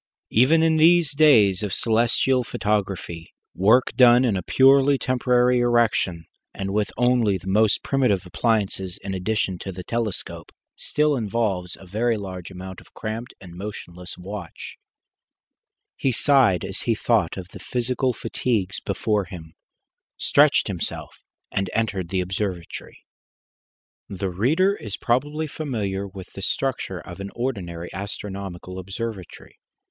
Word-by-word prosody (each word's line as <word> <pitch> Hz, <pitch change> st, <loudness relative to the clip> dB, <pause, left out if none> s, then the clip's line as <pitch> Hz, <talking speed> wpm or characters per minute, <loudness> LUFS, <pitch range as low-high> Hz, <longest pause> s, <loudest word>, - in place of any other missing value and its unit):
Even 145 Hz, +8 st, +4 dB
in 160 Hz, -1 st, +3 dB
these 165 Hz, -1 st, +5 dB
days 115 Hz, -11 st, +5 dB
of 105 Hz, -2 st, -3 dB
celestial 120 Hz, +3 st, +2 dB
photography, 95 Hz, -7 st, -3 dB, 0.2 s
work 110 Hz, +8 st, +4 dB
done 125 Hz, 0 st, +6 dB
in 110 Hz, -5 st, +1 dB
a 95 Hz, -, -1 dB
purely 135 Hz, +6 st, +5 dB
temporary 125 Hz, -1 st, +2 dB
erection, 115 Hz, -8 st, +1 dB, 0.3 s
and 95 Hz, 0 st, -3 dB
with 105 Hz, 0 st, 0 dB
only 120 Hz, -5 st, +3 dB
the 90 Hz, -, -15 dB
most 105 Hz, +2 st, +2 dB
primitive 125 Hz, -9 st, +1 dB
appliances 95 Hz, -2 st, -1 dB
in 95 Hz, 0 st, -4 dB
addition 95 Hz, -1 st, -1 dB
to 95 Hz, -, -6 dB
the 90 Hz, 0 st, -8 dB
telescope, 115 Hz, -1 st, -4 dB, 0.2 s
still 150 Hz, -1 st, +1 dB
involves 105 Hz, -6 st, -1 dB
a 95 Hz, -, -13 dB
very 110 Hz, +5 st, 0 dB
large 95 Hz, -3 st, -7 dB
amount 95 Hz, 0 st, -9 dB
of -, -, -21 dB
cramped 115 Hz, +3 st, -5 dB
and 90 Hz, -3 st, -12 dB
motionless 90 Hz, -2 st, -8 dB
watching. 95 Hz, -1 st, -8 dB, 1.2 s
He 135 Hz, -, +1 dB
sighed 125 Hz, -9 st, +3 dB
as 95 Hz, +1 st, -3 dB
he 115 Hz, -, +1 dB
thought 105 Hz, -7 st, +1 dB
of 95 Hz, -1 st, -7 dB
the -, -, -11 dB
physical 125 Hz, +1 st, 0 dB
fatigues 105 Hz, -4 st, -2 dB
before 105 Hz, 0 st, -1 dB
him, 80 Hz, -3 st, -10 dB, 0.6 s
stretched 145 Hz, 0 st, +4 dB
himself, 95 Hz, -5 st, -4 dB, 0.3 s
and 95 Hz, -1 st, -1 dB
entered 105 Hz, -6 st, -1 dB
the 95 Hz, 0 st, 0 dB
observatory. 90 Hz, -1 st, -5 dB, 1.0 s
The 95 Hz, -1 st, -3 dB
reader 155 Hz, -, +2 dB
is 105 Hz, -, -6 dB
probably 145 Hz, +6 st, 0 dB
familiar 105 Hz, -11 st, -3 dB
with 95 Hz, -1 st, -11 dB
the -, -, -8 dB
structure -, -, -2 dB
of -, -, -10 dB
an 100 Hz, 0 st, -5 dB
ordinary 90 Hz, -9 st, -4 dB
astronomical 95 Hz, -2 st, -6 dB
observatory. 95 Hz, 0 st, -7 dB
105 Hz, 135 wpm, -23 LUFS, 95-125 Hz, 1.2 s, done